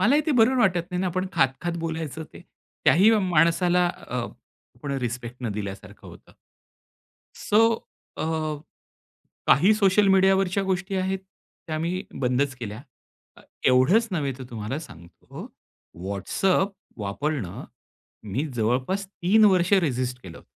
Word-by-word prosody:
मला 245 +6 +4
ही - - +4
ते - - +2
बरोबर 250 +1 +4
वाटत 180 -5 +1
नाही 180 0 -2
ना, 190 - 0
आपण 185 +1 -1
खात-खात 135 +6 0
बोलायचं 160 -1 -4
ते, - - -12 0.4
त्या - - +6
ही 195 +7 +6 0.2
माणसाला 175 +2 +3
अ, 125 - -7 0.6
आपण 140 -2 -6
रिस्पेक्ट 120 0 -4
न 120 - -1
दिल्यासारखं 100 -1 -7
होतं. - - -15 1.0
सो 210 +2 +2 0.6
अ, - - -3 1.3
काही 185 +11 +5
सोशल 200 -1 +3
मीडियावरच्या 195 0 +3
गोष्टी 190 +1 -2
आहेत, 190 0 -1 0.5
त्या 155 -1 -2
मी 175 +3 -2 0.2
बंदच 130 +2 +1
केल्या. 110 -2 -7 0.6
अ, - - -15 0.3
एवढंच 135 - +4
नव्हे 145 -6 -1
तर - - -6
तुम्हाला 115 +4 -4
सांगतो, 85 - -12 0.6
WhatsApp 185 - 0 0.3
वापरणं 105 - -3 0.7
मी 140 +6 0
जवळपास 130 - 0
3 200 +3 +3
वर्ष 185 -2 +3
रेजिस्ट 125 -5 -2
केलं 85 -3 -10
होतं. - - -17
165 Hz, 135 wpm, -25 LUFS, 125-190 Hz, 1.3 s, त्या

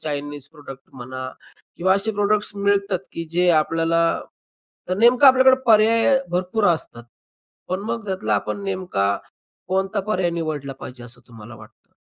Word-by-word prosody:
Chinese 145 -2 -5
product 135 -3 -11
म्हणा 130 0 -7 0.5
किंवा 190 +2 +2
असे 215 +3 -1
प्रॉडक्ट्स 205 0 0
मिळतात, 200 -1 +1
की 165 - -5
जे 180 +1 +2
आपल्याला 165 +1 0 0.9
तर 185 - -1
नेमकं 245 +4 +6
आपल्याकडे 260 0 +6
पर्याय 230 +4 +4
भरपूर 185 +4 -1
असतात. 120 -7 -7 0.6
पण 185 +2 -2
मग 230 -2 -4
त्यातला 190 +1 -1
आपण 200 - -3
नेमका 180 - -1 0.5
कोणता 190 +2 0
पर्याय 180 -4 +1
निवडला 155 -5 -4
पाहिजे 125 -1 -9
असं 120 - -13
तुम्हाला 115 0 -12
वाटतं? 110 0 -18
180 Hz, 140 wpm, -21 LUFS, 145-205 Hz, 0.9 s, नेमकं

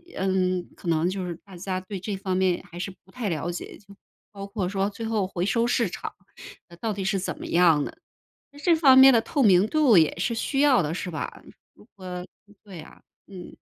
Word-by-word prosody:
嗯， 185 -1 0
可 - - -11
能 165 +1 +2
就 185 -1 -4
是 175 - -4
大 195 -2 -13
家 185 +1 -3
对 190 +1 -7
这 200 +2 -4
方 190 -1 -3
面 185 -2 +1
还 175 - -11
是 180 +2 -4
不 190 - -22
太 230 -3 -3
了 165 0 -3
解， 175 - -8
就 200 -1 -18 0.4
包 200 -2 -8
括 200 -2 -3
说 195 0 -1
最 215 +2 -7
后 220 -3 0
回 185 -2 -4
收 230 +3 +1
市 235 -3 +1
场 - - -7 0.7
到 225 -2 -1
底 195 -1 -4
是 195 +1 0
怎 185 - -4
么 - - -7
样 165 -4 +4
的？ - - -5
啊 - - -25 0.7
这 345 - +4
方 275 -5 +6
面 265 0 +9
的 230 - +4
透 280 +5 -1
明 195 -3 +5
度 260 - +4
也 160 -2 +3
是 195 +6 -1
需 270 +4 -1
要 280 -5 +5
的 155 +1 -3
是 180 0 -4
吧？ 155 - -6 0.3
如 - - -19
果 180 -2 -7 0.4
对 190 -5 -10
啊， - - -15 0.3
嗯。 185 -3 -11
195 Hz, 235 characters per minute, -25 LUFS, 180-220 Hz, 0.7 s, 面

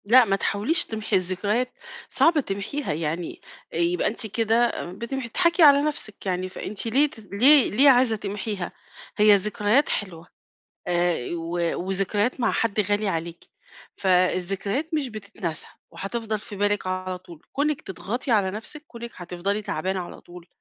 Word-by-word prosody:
لأ 245 +4 +7
ما 195 -2 +2
تحاوليش 210 - +1
تمحي 215 -1 -2
الذكريات، 200 +7 0 0.3
صعب 325 -1 +4
تمحيها 215 - -3
يعني 165 +2 -4 0.3
يبقى 170 +1 +1
أنتِ 220 +1 -1
كده 230 +2 +2 0.2
بتمح 235 +6 -5
تضحكي 340 +6 +3
على 285 -1 +8
نفْسِك 290 -10 -4
يعني، 185 0 -1
فأنتِ 195 +3 -6
ليه 280 +6 +3
ت 225 - -13
ليه 245 +7 +5
ليه 275 +7 +6
عايزة 250 -3 +5
تمحيها؟ 205 -1 -4 0.5
هي 210 0 +7
الذكريات 210 +6 +2
حلوة 170 -5 -3 0.6
آآ 175 -1 +2
ي 125 - -5
و 165 0 -5 0.3
وذكريات 205 +6 0
مع - - +2
حد 220 -2 +1
غالي 205 +1 +1
عليكِ، 170 -1 -4 0.5
فالذكريات 195 - +1
مش 295 -4 0
بتتنسى 200 -7 -5 0.2
وهتفضل 215 +5 -4
في 205 - -9
بالِك 205 0 0
على 185 0 -3
طول، 175 -3 -14
كونِك 290 0 0
تضغطي 230 - -4
على 205 -4 +3
نفْسِك، 225 +9 -8
كونِك 235 -3 -9
هتفضلي 185 +4 -3
تعبانة 190 -1 -2
على 175 - -8
طول، 175 -1 -13
205 Hz, 150 wpm, -24 LUFS, 185-235 Hz, 0.6 s, على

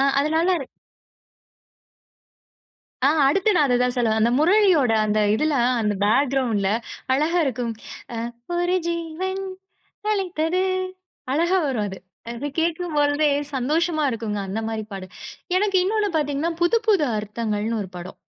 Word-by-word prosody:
அ - - +4 0.2
அதுனால. 320 +5 +2 2.6
ஆ. - - +6 0.2
அடுத்து 390 +8 +2
நான் 295 - +4
அத 245 - +3
தான் 250 0 0
சொல்ல 240 -2 +2
வந்தேன். 220 0 +1
அந்த 235 - +3
முரளியோட 345 - +4
அந்த 215 0 +1 0.2
இதுல 305 +5 +1 0.3
அந்த 210 -1 +1
பேக்கிரவுண்டுல 240 -4 +2 0.4
அழகா 310 +6 +2
இருக்கும். 245 -3 -2 0.8
அ - - -1
ஒரு 355 +1 +1
ஜீவன் 340 +3 -3 0.7
அழைத்தது. 365 -3 0 0.7
அழகா 340 +6 +2
வரும் 240 -7 -1
அது. 190 -1 -7 0.3
அதுலா 240 +5 -4
கேட்கும்போழ்தே 310 -3 +1 0.3
சந்தோஷமா 310 +5 0
இருக்குங்க, 215 -3 -3
அந்த 200 +4 -3
மாரி 220 -1 -3
பாட்டு. 195 -1 -6 0.5
எனக்கு 395 -1 +2
இன்னொன்னு 415 +1 +1
பாத்தீங்கன்னா, 295 +2 -1
புது 345 +7 +4
புது 390 -8 +4
அர்த்தங்கள்னு 215 +1 -2
ஒரு 190 - -6
படம். 175 +1 -9
290 Hz, 130 wpm, -23 LUFS, 230-345 Hz, 2.6 s, ஆ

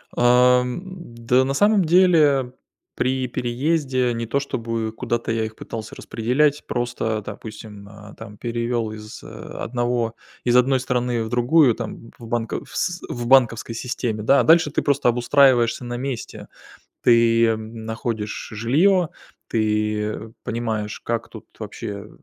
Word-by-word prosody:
Ам, 125 +3 +4
да 130 -9 -1
на 135 +1 -1
самом 205 +4 +3
деле, 155 -7 +4 0.4
при 130 0 0
переезде 130 +1 0
не 115 0 -3
то, 130 +5 0
чтобы 115 -5 -3
куда-то 120 +1 -3
я 110 0 0
их 110 0 -8
пытался 110 -1 -7
распределять, 140 +6 0
просто, 120 -3 -2
допустим, 105 -1 -9
э, 105 0 -13
там 105 -2 -10
перевёл 115 -1 -2
из, 105 0 -10
э, - - -10
одного 120 -1 -3 0.3
из 120 0 +3
одной 130 +1 +4
страны 125 -2 -1
в - - -5
другую, 125 +2 +4
там, 115 - -7
в 115 - -11
банковс 120 +9 -3
в 120 -1 -4
банковской 120 -3 +3
системе, 115 -2 -3
да, 135 +6 +5
а - - +1
дальше 160 -2 +5
ты - - 0
просто 140 -3 +2
обустраиваешься 120 -1 +3
на 120 0 -4
месте. 130 -2 -5 0.6
Ты 115 -1 +4
находишь 110 0 -5
жилье, 160 - +2 0.4
ты, 105 -1 0
э, 110 - -8
понимаешь, 110 -2 -3
как 115 -1 -3
тут - - -11
вообще 100 0 -6
120 Hz, 140 wpm, -22 LUFS, 115-130 Hz, 0.6 s, да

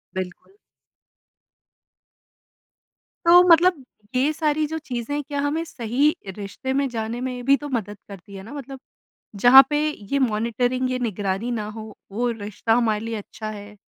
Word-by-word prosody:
बिल्कुल। 185 - -6 2.7
तो 345 +1 +8
मतलब 335 -3 +5 0.3
ये 270 +4 +3
सारी 305 -1 0
जो 320 +2 -4
चीज़ें 275 0 -4
क्या 285 +1 -4
हमें 295 +3 -1
सही 280 0 0 0.2
रिश्ते 205 +6 -4
में 275 +1 +1
जाने 230 0 -4
में 250 -1 -4
भी 275 +1 +5
तो 290 0 -7
मदद 210 -6 -3
करती 200 0 -11
है 190 - -8
ना 225 - -10
मतलब 275 -2 -8 0.6
जहाँ 245 +6 +9
पे 295 - +1
ये 280 -1 -3
मॉनिटरिंग, 245 +2 0
ये 255 - -1
निगरानी 210 0 -2
ना 220 -3 -2
हो 215 -1 -9 0.2
वो 240 +4 -1
रिश्ता 215 0 -2
हमारे 225 -3 +2
लिए 230 0 -3
अच्छा 215 +1 -7
है। 210 0 -10
245 Hz, 150 wpm, -23 LUFS, 215-280 Hz, 2.7 s, जहाँ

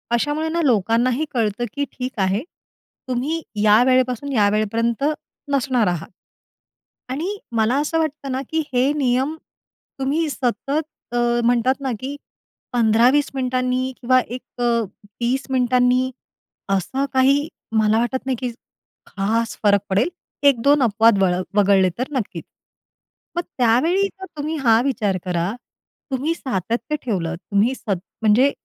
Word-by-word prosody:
अशामुळे 295 +6 -1
ना 335 +1 0
लोकांनाही 240 +4 +2
कळतं 225 -1 0
की 285 0 -1
ठीक 255 -2 -6
आहे, 195 +3 0 0.7
तुम्ही 265 +6 -1 0.2
या 215 +2 +6
वेळेपासून 255 +1 +1
या 205 -4 +4
वेळेपर्यंत 225 +4 0 0.5
नसणार 255 -5 +2
आहात 175 -2 -2 1.0
आणि 345 +10 -3 0.2
मला 225 +3 +2
असं 325 +2 0
वाटतं 305 -3 -2
ना, 260 - -1
की 320 0 0
हे 255 +3 +3
नियम 265 +2 +1 0.6
तुम्ही 295 +4 0
सतत 265 0 -2 0.4
अ, 240 - -1 0.3
म्हणतात 245 +2 +3
ना 265 -2 -1
की 270 +2 -5 0.6
15-20 245 +5 +4
मिनिटांनी 255 0 0
किंवा 255 +1 +4
एक, 250 +2 -6 0.8
30 250 +3 0
मिनिटांनी, 250 0 +2 0.6
असं 265 +9 -1
काही 275 +3 +3 0.3
मला 215 0 +3
वाटत 245 +2 -1
नाही 265 -1 0
की 250 -2 -2 0.6
खास 225 +4 -1
फरक 205 -1 +4
पडेल, 200 - +2 0.3
1-2 280 +1 +4
अपवाद 225 -1 +4
वळ 185 -2 +3 0.2
वगळले 195 -2 +4
तर 255 +4 -3
नक्कीच. 250 -7 -3 0.9
मग 345 - +1 0.2
त्यावेळी 270 +12 +3
जर 385 -1 -11
तुम्ही 305 +2 -2
हा 225 -2 +5
विचार 215 -8 0
करा, 175 0 -1 0.6
तुम्ही 275 +5 0
सातत्य 235 - -2
ठेवलं 175 -7 -1
तुम्ही 200 +7 0
सत 200 -7 -2 0.2
म्हणजे 225 +6 +4
250 Hz, 130 wpm, -21 LUFS, 220-275 Hz, 1.0 s, या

